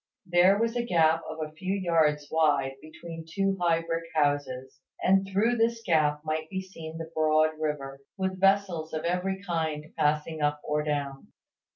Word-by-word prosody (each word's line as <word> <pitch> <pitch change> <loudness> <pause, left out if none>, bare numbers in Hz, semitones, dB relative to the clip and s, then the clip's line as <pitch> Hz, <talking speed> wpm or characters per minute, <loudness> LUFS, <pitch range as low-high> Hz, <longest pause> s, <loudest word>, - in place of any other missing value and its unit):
There 180 +3 +5
was 230 +2 0
a 240 - 0
gap 165 -6 +3
of 155 - -6
a - - -16
few 185 +4 -2
yards 160 -6 +1
wide 145 -4 +2
between 165 +1 -9
two 195 +1 +1
high 165 -1 +2
brick 165 0 -3
houses: 145 -3 -1 0.2
and 195 +1 +3
through 225 +5 +2
this 230 0 +1
gap 150 -3 +2
might 155 0 -2
be 190 - -3
seen 165 -4 -8
the 165 0 -7
broad 155 0 +3
river, 140 -3 -3 0.2
with 190 -1 -2
vessels 195 -5 +2
of 155 - -3
every 190 +3 -1
kind 160 -4 -3
passing 155 +1 0
up 145 0 +1
or 150 0 0
down. 145 -2 -3
160 Hz, 170 wpm, -28 LUFS, 150-190 Hz, 0.2 s, There